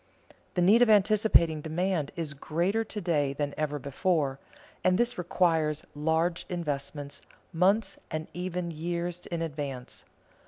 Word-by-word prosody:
The 180 - +3
need 210 +6 +6
of 245 - +6
anticipating 205 -6 +4
demand 165 -1 -1
is 160 -4 -3
greater 175 +10 0
to 220 -1 -5
day 150 -6 +1
than 145 0 -2
ever 150 -1 -1
before, 140 -1 0 0.4
and 185 0 +4
this 240 +2 +1
requires 165 -4 +1
large 160 +3 0
investments 145 -4 -4 0.3
months 195 +6 +2
and 155 0 -4
even 180 -1 -3
years 170 +2 -3
in 170 -1 -2
advance. 140 -5 -5
165 Hz, 130 wpm, -29 LUFS, 150-180 Hz, 0.4 s, need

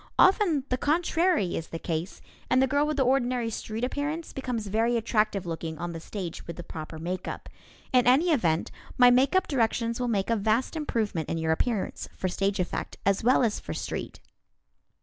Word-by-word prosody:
Often 365 -7 +4
the 255 - 0
contrary 325 - +2
is 165 - -4
the 165 - -5
case, 165 +2 -4 0.3
and 255 - +4
the 265 - +5
girl 285 +3 +1
with 305 -1 -1
the 270 - +4
ordinary 250 -2 +1
street 220 +1 -5
appearance 295 +5 -2
becomes 250 -5 -3
very 225 +4 +1
attractive 215 -4 0
looking 165 -1 -4
on 175 +2 -4
the 165 - -5
stage 175 0 -6
with 170 - -5
the 175 - -7
proper 160 -1 -7
makeup. 180 +3 -5 0.5
In 250 -1 +4
any 295 +8 +5
event, 170 - +1 0.3
my 245 -1 +8
makeup 275 +10 +3
directions 230 -3 0
will 250 - 0
make 210 -2 0
a - - +4
vast 220 +7 0
improvement 220 - -2
in 165 - -1
your 160 0 0
appearance 210 +5 -1
for 185 - -1
stage 195 +2 -1
effect, 180 - -3
as 200 +1 +2
well 250 +2 +4
as 220 -3 +1
for 80 - -6
street. - - -5
230 Hz, 190 wpm, -27 LUFS, 180-265 Hz, 0.5 s, my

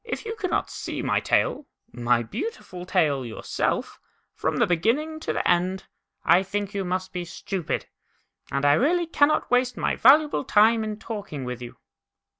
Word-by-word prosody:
you 445 0 -4
cannot 370 -4 -1
see - - -5
my - - +1
tail, 395 - 0 0.2
my 120 0 +1
beautiful 180 - -6
tail, 150 -8 +2
yourself, 115 -2 -3 0.3
from - - -2
the - - +4
beginning 265 - 0
to - - -3
the - - -1
end, 185 +2 +1 0.4
I 180 - +6
think 200 +1 -3
you 200 -1 -2
must 185 +1 -3
be 180 -1 -3
stupid, 175 0 -4 0.7
and 140 +1 0
I 145 - +6
really 340 - +2
cannot 305 -2 +2
waste 250 0 +2
my - - 0
valuable 295 +4 +5
time 220 -1 +4
in 215 -1 -4
talking 205 - -6
with 125 0 -5
you." 120 - -9
195 Hz, 160 wpm, -25 LUFS, 170-275 Hz, 0.7 s, I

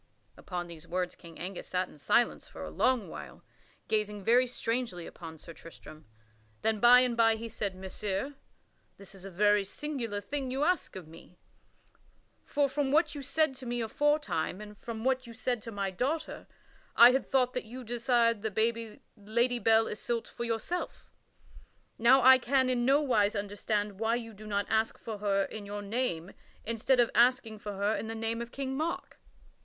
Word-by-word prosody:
Upon 175 -2 -5
these 170 -3 -11
words, 180 0 -2
King 170 -2 -13
Angus 185 +1 -6
sat 185 0 -1
in 150 - -17
silence 240 +11 +1
for - - -9
a - - -6
long 255 -5 +1
while, - - -10 0.4
gazing 210 -2 -1
very 245 +4 +4
strangely 230 -7 -3
upon 160 -2 -10
Sir 165 - -11
Tristram. 155 -1 -13 0.6
Then 220 -1 +1
by 245 +3 +8
and 250 -2 +1
by 225 -1 +4
he 230 +1 -6
said: 200 -3 -4
"Messire, 195 +6 -3 0.6
this 200 +1 -13
is 195 -1 -12
a - - -6
very 205 +2 +3
singular 230 -1 -4
thing 265 +6 -4
you 265 +3 -1
ask 360 +3 0
of 185 -4 -8
me; 165 +2 -15 1.1
for 285 -1 +1
from 275 0 -1
what 315 +1 +3
you 290 - -6
said 310 +1 +1
to 255 - -8
me 240 0 -2
aforetime 235 - 0
and 210 0 -10
from 225 -2 -6
what 260 -1 0
you 230 - -10
said 245 0 -1
to 230 - -8
my 200 -2 -2
daughter 275 - -3 0.5
I 240 +1 +9
had 265 +1 0
thought 255 -2 +2
that 250 - -3
you 250 +3 -8
desired 235 -1 +1
the 220 +1 -1 0.2
Lady 235 +4 0
Belle 225 -1 +4
Isoult 230 +2 -3
for 235 - -5
yourself. 235 +10 -3 0.9
Now 250 +3 +6
I 260 +1 +8
can 260 +1 +2
in 240 -1 0
no 275 +3 +4
wise 220 -7 +2
understand 205 0 -2
why 225 +1 +1
you 230 -2 -6
do 215 +1 -11
not 205 -1 0
ask 220 0 +1
for 220 -3 -7
her 200 -1 +1
in 205 0 -7
your 205 0 -5
name 200 -6 -2 0.3
instead 230 +3 +1
of 240 - +4
asking 235 -2 +3
for 205 0 -6
her 200 +2 0
in - - -4
the 225 - -5
name 225 +1 -2
of 235 0 -7
King 265 -1 -4
Mark." 315 +4 -3
225 Hz, 185 wpm, -30 LUFS, 205-250 Hz, 1.1 s, I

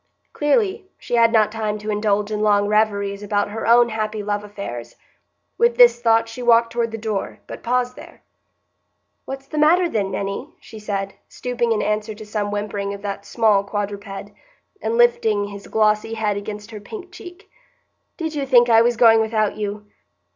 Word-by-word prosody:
Clearly, 380 +4 0
she - - -8
had 230 -1 +5
not 215 -2 +3
time 215 -1 -2
to 210 +1 -4
indulge 210 0 0
in 210 - -2
long 205 -1 +3
reveries 205 -1 0
about 205 0 -1
her 225 +1 -4
own 235 +1 +6
happy 215 -1 -3
love 205 0 -2
affairs. 200 - -7 0.6
With 470 0 +3
this 485 - +6
thought 230 -1 +3
she 225 +2 -8
walked 230 -1 +4
toward 235 -1 0
the 225 - -6
door, 215 -3 -3
but - - -9
paused 250 +1 -1
there. - - -14 1.0
"What's 270 0 -7
the 300 +2 -4
matter, 345 +4 +4
then, 205 -11 -1
Minny?" 195 +1 -4
she 220 - -12
said, 195 -2 -3 0.2
stooping 240 -2 -2
in 220 - +1
answer 210 +1 -2
to 215 +1 -10
some 210 -1 -3
whimpering 205 -1 -3
of 200 - -13
that 200 0 -5
small 210 -2 +3
quadruped, 200 0 -5 0.5
and 225 +1 -1
lifting 220 -4 +3
his 200 0 -10
glossy 215 +1 +1
head 215 -2 -1
against 210 +2 -7
her 215 - -7
pink 365 - -10
cheek. 360 +2 -12 0.7
"Did 320 -2 -3
you 280 -2 -3
think 245 -2 +5
I 225 0 +7
was 240 0 +2
going 225 -2 +6
without 220 -1 0
you? 210 0 -5
215 Hz, 180 wpm, -21 LUFS, 205-235 Hz, 1.0 s, I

